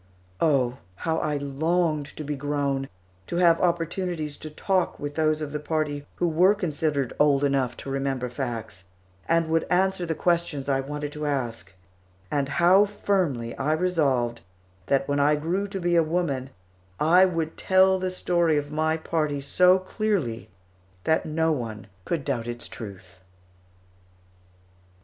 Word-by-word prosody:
Oh, 130 Hz, -6 st, +2 dB, 0.2 s
how 160 Hz, -, -1 dB
I 150 Hz, -1 st, -1 dB
longed 155 Hz, +2 st, 0 dB
to 155 Hz, -, -4 dB
be 145 Hz, 0 st, -3 dB
grown, 140 Hz, -1 st, -1 dB, 0.4 s
to -, -, -4 dB
have 170 Hz, -1 st, +4 dB
opportunities 170 Hz, -2 st, -1 dB
to 155 Hz, -, -8 dB
talk 185 Hz, +4 st, 0 dB
with 145 Hz, 0 st, -4 dB
those 155 Hz, 0 st, +1 dB
of 150 Hz, -1 st, -4 dB
the 150 Hz, -, -3 dB
party 150 Hz, -1 st, -2 dB
who 175 Hz, -, 0 dB
were 180 Hz, +5 st, +4 dB
considered 150 Hz, -, -1 dB
old 145 Hz, -1 st, +4 dB
enough 135 Hz, -3 st, +1 dB
to -, -, -5 dB
remember 135 Hz, -2 st, -1 dB
facts, 120 Hz, -7 st, -5 dB, 0.4 s
and 165 Hz, 0 st, +3 dB
would 160 Hz, 0 st, +1 dB
answer 185 Hz, 0 st, +2 dB
the 160 Hz, -, -1 dB
questions 170 Hz, -6 st, 0 dB
I 135 Hz, -1 st, +2 dB
wanted 145 Hz, +2 st, -4 dB
to 150 Hz, 0 st, -4 dB
ask; 120 Hz, -8 st, -3 dB, 0.6 s
and 140 Hz, -1 st, 0 dB
how 180 Hz, +6 st, +5 dB
firmly 180 Hz, -, -1 dB
I 145 Hz, +3 st, +1 dB
resolved 140 Hz, -9 st, +1 dB, 0.5 s
that 135 Hz, 0 st, +1 dB
when 145 Hz, 0 st, 0 dB
I 145 Hz, +1 st, +4 dB
grew 175 Hz, +7 st, -1 dB
to 195 Hz, -1 st, -5 dB
be 175 Hz, -1 st, +1 dB
a 170 Hz, -, +6 dB
woman 155 Hz, -6 st, -1 dB, 0.5 s
I 175 Hz, +5 st, +6 dB
would 165 Hz, -3 st, -2 dB
tell 190 Hz, 0 st, +4 dB
the 185 Hz, 0 st, -1 dB
story 175 Hz, -3 st, +1 dB
of 145 Hz, 0 st, -3 dB
my 160 Hz, +1 st, +1 dB
party 155 Hz, -3 st, -1 dB
so 180 Hz, +7 st, +4 dB
clearly 185 Hz, -, -2 dB, 0.5 s
that 160 Hz, 0 st, +1 dB
no 160 Hz, +1 st, +1 dB
one 115 Hz, -8 st, -4 dB, 0.2 s
could 165 Hz, -5 st, -2 dB
doubt 120 Hz, -5 st, -2 dB
its 120 Hz, 0 st, -4 dB
truth! 90 Hz, -4 st, -10 dB
150 Hz, 155 wpm, -25 LUFS, 140-170 Hz, 0.6 s, a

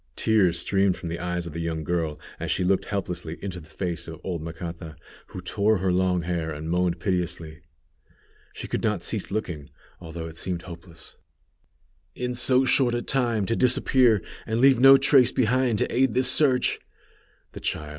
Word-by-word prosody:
Tears 95 Hz, -6 st, +2 dB
streamed 95 Hz, +1 st, +1 dB
from 85 Hz, -, -6 dB
the 85 Hz, -, -4 dB
eyes 90 Hz, 0 st, -3 dB
of 85 Hz, -, -8 dB
the 85 Hz, -, -4 dB
young 80 Hz, -1 st, -3 dB
girl 80 Hz, -2 st, -2 dB, 0.2 s
as -, -, -4 dB
she -, -, 0 dB
looked 95 Hz, +1 st, +1 dB
helplessly 90 Hz, -5 st, -4 dB
into 95 Hz, -2 st, -6 dB
the 80 Hz, -1 st, -15 dB
face 90 Hz, -2 st, -4 dB
of 80 Hz, -1 st, -8 dB
old 85 Hz, -4 st, -4 dB
Macata, 85 Hz, 0 st, -7 dB, 0.3 s
who 90 Hz, -, -8 dB
tore 105 Hz, +4 st, +1 dB
her 95 Hz, 0 st, 0 dB
long 90 Hz, -1 st, +1 dB
hair, 85 Hz, -2 st, -3 dB
and 80 Hz, +2 st, -5 dB
moaned 90 Hz, -1 st, 0 dB
piteously. 85 Hz, -4 st, -3 dB, 0.9 s
She -, -, -8 dB
could -, -, -3 dB
not -, -, -1 dB
cease -, -, -2 dB
looking, 85 Hz, -8 st, -4 dB, 0.3 s
although 80 Hz, -1 st, -7 dB
it 80 Hz, 0 st, -9 dB
seemed 85 Hz, -1 st, -4 dB
hopeless. 85 Hz, -2 st, -12 dB, 1.0 s
"In 125 Hz, 0 st, -3 dB
so 130 Hz, +2 st, +4 dB
short 125 Hz, -2 st, +2 dB
a 120 Hz, -, -2 dB
time 120 Hz, -6 st, 0 dB
to 115 Hz, -, -1 dB
disappear, 125 Hz, -4 st, +3 dB, 0.2 s
and 110 Hz, +1 st, -1 dB
leave 135 Hz, -1 st, +5 dB
no 135 Hz, +1 st, +8 dB
trace 135 Hz, -2 st, +4 dB
behind 125 Hz, -1 st, +1 dB
to -, -, -1 dB
aid 130 Hz, -2 st, +2 dB
this 130 Hz, 0 st, +3 dB
search!" 130 Hz, -4 st, +3 dB, 0.7 s
The -, -, -9 dB
child! 75 Hz, -1 st, -3 dB
90 Hz, 180 wpm, -25 LUFS, 85-120 Hz, 1.0 s, no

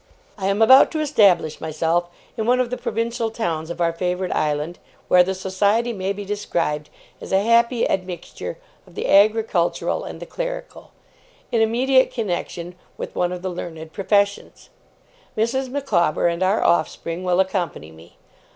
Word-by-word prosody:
'I 190 Hz, -, -1 dB
am 200 Hz, +2 st, 0 dB
about 260 Hz, +4 st, +8 dB
to 315 Hz, -, -3 dB
establish 200 Hz, -, +3 dB
myself 165 Hz, +2 st, 0 dB, 0.3 s
in 220 Hz, -2 st, -3 dB
one 250 Hz, +1 st, +3 dB
of 250 Hz, -1 st, 0 dB
the -, -, -1 dB
provincial 230 Hz, +1 st, -2 dB
towns 170 Hz, -8 st, -3 dB
of 170 Hz, -, -6 dB
our 170 Hz, -1 st, +1 dB
favoured 180 Hz, +1 st, -2 dB
island 150 Hz, +3 st, -1 dB, 0.3 s
(where 180 Hz, -, +7 dB
the 190 Hz, +2 st, 0 dB
society 200 Hz, +5 st, 0 dB
may 190 Hz, -2 st, -2 dB
be 200 Hz, 0 st, -5 dB
described 170 Hz, -7 st, -2 dB, 0.3 s
as -, -, -8 dB
a 190 Hz, +1 st, +3 dB
happy 235 Hz, +1 st, +3 dB
admixture 185 Hz, -, -4 dB, 0.3 s
of -, -, -18 dB
the -, -, -3 dB
agricultural 210 Hz, -, +2 dB
and -, -, -8 dB
the -, -, -7 dB
clerical), -, -, -6 dB, 0.6 s
in 230 Hz, -, +2 dB
immediate 260 Hz, +4 st, +3 dB
connexion 180 Hz, -5 st, -4 dB, 0.2 s
with -, -, -7 dB
one 175 Hz, 0 st, 0 dB
of 180 Hz, 0 st, -6 dB
the 185 Hz, -, -2 dB
learned 160 Hz, -2 st, -7 dB
professions. 200 Hz, 0 st, -1 dB, 0.7 s
Mrs. 255 Hz, +4 st, 0 dB
Micawber 210 Hz, -, +1 dB
and 170 Hz, +1 st, -1 dB
our 190 Hz, +4 st, +2 dB
offspring 170 Hz, +1 st, 0 dB
will 180 Hz, 0 st, +1 dB
accompany 185 Hz, -, -1 dB
me. 80 Hz, +2 st, -17 dB
190 Hz, 160 wpm, -22 LUFS, 175-230 Hz, 0.7 s, about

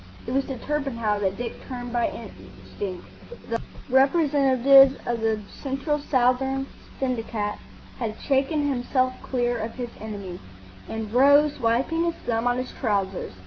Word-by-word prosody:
It -, -, -4 dB
was 275 Hz, +1 st, +1 dB
to 265 Hz, -, -5 dB
Torpenhow 235 Hz, -7 st, -1 dB
that 190 Hz, -1 st, -1 dB
Dick 240 Hz, -1 st, -5 dB
turned 245 Hz, -2 st, -6 dB
by 240 Hz, -1 st, +2 dB
instinct. 185 Hz, -3 st, -8 dB, 0.5 s
The 230 Hz, -, 0 dB, 0.3 s
representative 270 Hz, -1 st, +5 dB
of 235 Hz, -1 st, -1 dB
the 220 Hz, -1 st, +1 dB, 0.2 s
Central 275 Hz, +2 st, -1 dB
Southern 265 Hz, 0 st, +1 dB, 0.3 s
Syndicate 225 Hz, -5 st, -2 dB, 0.4 s
had 220 Hz, -3 st, -3 dB
shaken 285 Hz, +2 st, +1 dB
himself 255 Hz, -1 st, +1 dB
clear 245 Hz, -2 st, -1 dB
of 225 Hz, +1 st, -4 dB
his 245 Hz, -2 st, -4 dB
enemy, 200 Hz, -5 st, -6 dB, 0.5 s
and 220 Hz, -1 st, -5 dB
rose, 285 Hz, +3 st, +5 dB
wiping 255 Hz, +8 st, +1 dB
his 335 Hz, -, -1 dB
thumb 230 Hz, 0 st, 0 dB
on 245 Hz, 0 st, +2 dB
his 255 Hz, 0 st, -4 dB
trousers. 195 Hz, -, -2 dB
250 Hz, 140 wpm, -25 LUFS, 225-270 Hz, 0.5 s, representative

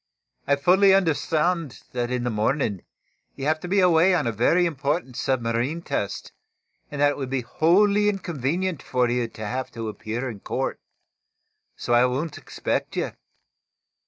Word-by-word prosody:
I 140 Hz, -, +4 dB
fully 190 Hz, +7 st, +5 dB
understand 165 Hz, -3 st, 0 dB
that 120 Hz, -1 st, -2 dB
in 125 Hz, -1 st, -1 dB
the 120 Hz, -, -1 dB
morning, 105 Hz, -, 0 dB, 0.5 s
you 135 Hz, -, -5 dB
have 155 Hz, +1 st, +1 dB
to 180 Hz, -, -7 dB
be 195 Hz, +3 st, +2 dB
away 180 Hz, +1 st, +5 dB
on 160 Hz, -, 0 dB
a 115 Hz, -, +1 dB
very 145 Hz, -, +3 dB
important 145 Hz, -3 st, -2 dB
submarine 125 Hz, +6 st, -1 dB
test, 100 Hz, -, -3 dB, 0.6 s
and 145 Hz, -, -6 dB
that 145 Hz, 0 st, +4 dB
it -, -, -6 dB
would 135 Hz, -2 st, -4 dB
be 135 Hz, -1 st, -1 dB
wholly 200 Hz, -, +3 dB
inconvenient 175 Hz, -2 st, -2 dB
for 125 Hz, -1 st, 0 dB
you 120 Hz, -1 st, 0 dB
to 110 Hz, -1 st, -8 dB
have 130 Hz, +4 st, -3 dB
to 115 Hz, -2 st, -4 dB
appear 110 Hz, +4 st, -4 dB
in 110 Hz, -5 st, -6 dB
court. -, -, -3 dB, 1.0 s
So 120 Hz, -, -2 dB
I 120 Hz, +1 st, +6 dB
won't 145 Hz, +5 st, -3 dB
expect -, -, -3 dB
you. -, -, -1 dB
140 Hz, 160 wpm, -24 LUFS, 120-170 Hz, 1.0 s, I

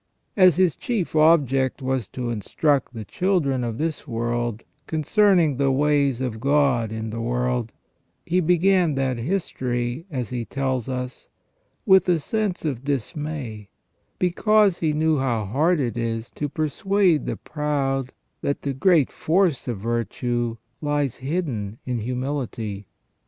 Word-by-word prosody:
As 185 Hz, -4 st, +6 dB
his 180 Hz, -3 st, +3 dB
chief 210 Hz, -10 st, -2 dB
object 140 Hz, -5 st, +3 dB
was 130 Hz, -5 st, -2 dB
to 120 Hz, -2 st, -4 dB
instruct 130 Hz, -, 0 dB
the 110 Hz, -2 st, -6 dB
children 155 Hz, -, 0 dB
of 115 Hz, -2 st, -3 dB
this 155 Hz, 0 st, -3 dB
world 120 Hz, -1 st, -2 dB, 0.2 s
concerning 165 Hz, -, +3 dB
the 140 Hz, 0 st, +2 dB
ways 140 Hz, -2 st, +2 dB
of 120 Hz, -4 st, -3 dB
God 135 Hz, -4 st, +2 dB
in 110 Hz, 0 st, -4 dB
the 115 Hz, +1 st, -4 dB
world, 125 Hz, -1 st, -1 dB, 0.5 s
he 180 Hz, +2 st, +1 dB
began 180 Hz, -1 st, +3 dB
that 130 Hz, -3 st, -1 dB
history, 125 Hz, -2 st, -2 dB
as 130 Hz, -7 st, -3 dB
he 120 Hz, -2 st, -2 dB
tells 130 Hz, -1 st, -2 dB
us, 125 Hz, 0 st, -5 dB, 0.6 s
with 190 Hz, -3 st, +5 dB
a 175 Hz, -, +4 dB
sense 200 Hz, +3 st, -2 dB
of 135 Hz, -5 st, -2 dB
dismay, 140 Hz, -, -4 dB, 0.5 s
because 200 Hz, +1 st, +3 dB
he 160 Hz, -2 st, +1 dB
knew 155 Hz, -1 st, +2 dB
how 120 Hz, -5 st, 0 dB
hard 155 Hz, -, +2 dB
it 120 Hz, -4 st, -1 dB
is 115 Hz, 0 st, -3 dB
to 145 Hz, -, -4 dB
persuade 170 Hz, +3 st, +1 dB
the -, -, -2 dB
proud 135 Hz, -3 st, -2 dB, 0.3 s
that 140 Hz, -, -2 dB
the 140 Hz, -, -1 dB
great 165 Hz, -1 st, +3 dB
force 170 Hz, -5 st, +1 dB
of 120 Hz, -4 st, -2 dB
virtue 120 Hz, +2 st, -2 dB, 0.2 s
lies 145 Hz, -3 st, 0 dB
hidden 130 Hz, -, -3 dB
in 125 Hz, -2 st, -2 dB
humility. 120 Hz, -4 st, -4 dB
135 Hz, 140 wpm, -23 LUFS, 120-160 Hz, 0.6 s, As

